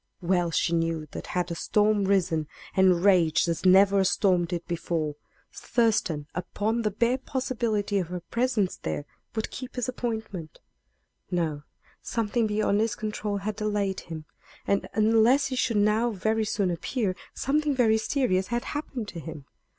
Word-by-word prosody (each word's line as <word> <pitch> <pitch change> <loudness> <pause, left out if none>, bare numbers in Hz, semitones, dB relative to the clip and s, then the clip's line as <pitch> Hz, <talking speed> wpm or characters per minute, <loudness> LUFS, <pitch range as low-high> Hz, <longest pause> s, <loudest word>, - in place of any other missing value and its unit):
Well 175 -1 +1
she 165 +1 +1
knew 165 -2 0
that - - -7
had 180 -1 -2
a - - -2
storm 210 +1 +2
risen, 180 -6 +1 0.3
and 185 -1 +4
raged 175 -4 +4
as 170 +2 -2
never 195 +2 +6
a 190 - +3
storm 185 -2 +3
did 170 0 -4
before, 160 -3 -2 0.4
Thurston, 215 -11 0
upon 210 +6 -1
the 215 - +1
bare 235 +5 +1
possibility 235 -7 -1
of 180 - -2
her 180 +1 -4
presence 235 -1 0
there, 145 - -4 0.3
would 220 - -2
keep 255 0 -7
his 245 -2 -1
appointment. 220 -10 -4 0.7
No; 160 -5 -1 0.4
something 230 0 0
beyond 210 -1 +1
his 220 -1 0
control 210 -1 -3
had 205 +1 -3
delayed 210 -3 -1
him. 160 -2 -8 0.4
And, 200 - 0
unless 225 +6 +4
he 265 - -2
should 235 -3 +1
now 210 +3 +3
very 220 +1 0
soon 200 -3 0
appear, 190 +3 -2 0.2
something 295 +1 +1
very 220 -3 +3
serious 220 -7 +1
had 240 +2 -1
happened 270 -6 -4
to 170 - -7
him. 155 -3 -8
205 Hz, 160 wpm, -27 LUFS, 175-225 Hz, 0.7 s, never